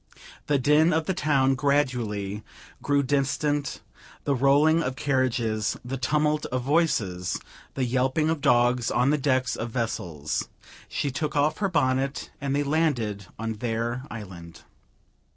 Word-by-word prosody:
The 145 - +3
din 150 +5 +4
of 160 0 +1
the 190 - 0
town 140 -6 +2
gradually 125 -8 0 0.4
grew 140 0 +2
distant; 145 +1 0 0.4
the 140 - +1
rolling 145 +5 +4
of 130 -4 -2
carriages, 125 -6 0
the 130 +2 -3
tumult 150 +4 +1
of 130 0 -2
voices, 120 - 0 0.4
the 135 - 0
yelping 130 +5 +1
of 160 -3 -2
dogs 120 -1 +3
on 125 +3 +2
the 150 - +1
decks 130 -2 +1
of 120 - -4
vessels. 90 - -3 0.4
She 140 - -2
took 150 +3 -3
off 150 +2 +2
her 200 -2 +1
bonnet, 135 -4 0
and 140 0 -1
they 145 - +1
landed 130 - 0
on 115 0 -3
their 120 +1 -2
island. 90 -6 -9
130 Hz, 140 wpm, -26 LUFS, 120-145 Hz, 0.4 s, din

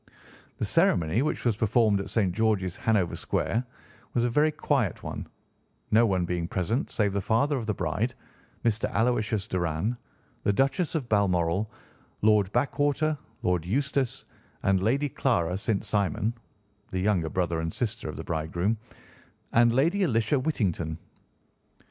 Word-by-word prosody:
"'The - - -1
ceremony, 85 +7 +3
which 150 - -2
was 115 -3 +3
performed 110 -1 +3
at 100 - -5
St. 100 -6 +1
George's, 105 -4 +1
Hanover 105 -6 +1
Square, 115 +3 -1 0.5
was 120 - +3
a 120 - +1
very 150 +5 +3
quiet 135 - 0
one, - - -5 0.6
no 115 +2 +5
one 95 -3 +1
being 85 -1 -2
present 100 - -1
save 105 -3 0
the 100 - 0
father 120 +9 +2
of 120 -4 -3
the 105 - +1
bride, 95 +10 -1 0.5
Mr. 115 -1 +1
Aloysius 110 -3 +1
Doran, 90 +5 -1 0.5
the - - +2
Duchess 135 - +1
of 140 -6 -1
Balmoral, 95 -2 +1 0.5
Lord 105 -2 +4
Backwater, 145 +5 +1 0.3
Lord 90 -2 +1
Eustace 135 +5 -1 0.4
and 95 -1 +3
Lady 135 +8 +2
Clara 90 -11 0
St. 105 +1 -1
Simon 105 +2 0 0.6
(the 95 - -2
younger 90 -5 +1
brother 85 -1 -1
and 80 0 -2
sister 115 -5 -3
of 75 - -6
the 80 - -5
bridegroom), 85 +7 -1 0.8
and 120 0 +5
Lady 165 +11 +2
Alicia 135 - +2
Whittington. 90 - -1
105 Hz, 145 wpm, -27 LUFS, 90-120 Hz, 0.8 s, no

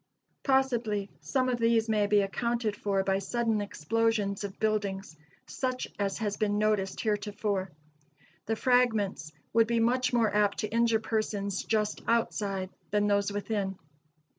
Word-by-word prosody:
Possibly 240 -7 +1
some 260 -2 0
of 245 -1 0
these 230 -1 +3
may 210 -2 +2
be 205 0 +4
accounted 230 +2 -1
for 200 -2 0
by 195 0 +1
sudden 225 +1 0
explosions 205 +2 0
of 200 -1 -6
buildings, 200 -5 -1 0.3
such 255 -1 -3
as 200 -1 0
has 210 -3 -2
been 205 -1 +1
noticed 210 -3 0
heretofore. 205 -2 -1 0.8
The 225 - +1
fragments 220 - +1 0.2
would 225 0 +4
be 235 0 +1
much 250 +2 +2
more 230 -4 +2
apt 205 -1 +2
to 215 - -1
injure 230 -1 +3
persons 205 -3 -2
just 210 -1 0
outside 200 -5 0 0.2
than 205 0 +2
those 200 0 +2
within. 200 -2 -2
210 Hz, 140 wpm, -29 LUFS, 200-230 Hz, 0.8 s, be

